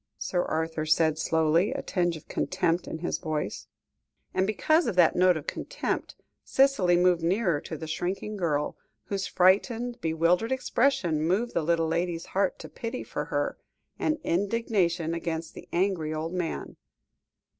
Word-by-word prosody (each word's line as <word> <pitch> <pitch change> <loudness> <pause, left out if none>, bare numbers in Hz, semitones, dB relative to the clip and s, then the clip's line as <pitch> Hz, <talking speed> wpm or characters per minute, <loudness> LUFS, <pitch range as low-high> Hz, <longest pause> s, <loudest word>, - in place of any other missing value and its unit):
Sir 180 - -1
Arthur 160 -1 -2
said 155 0 +3
slowly, 160 +4 +2
a - - -4
tinge 175 -3 0
of 155 - -16
contempt 170 +2 0
in - - -4
his - - -1
voice; 155 -3 -3 0.7
and 190 +1 +1
because 310 - +2
of 220 - -1
that 175 -3 +5
note 180 -1 +4
of 150 - -7
contempt, - - -3 0.3
Cicely 240 -11 +3
moved 180 -1 +3
nearer 175 -3 +1
to 160 - -6
the 160 - -6
shrinking 185 +6 -3
girl, 155 -6 -1 0.3
whose 200 -1 -3
frightened, 230 +6 +2
bewildered 170 +7 +2
expression 240 - +1
moved 190 +9 0
the - - +1
little 165 +1 +1
lady's 170 +1 -1
heart 195 -1 +1
to - - -9
pity 235 +2 -5
for - - -4
her, - - -2 0.4
and 310 0 +1
indignation 180 -4 0
against 165 -1 -3
the - - -11
angry 170 -4 0
old 160 +2 -3
man. 175 -3 -3
175 Hz, 155 wpm, -27 LUFS, 160-200 Hz, 0.7 s, that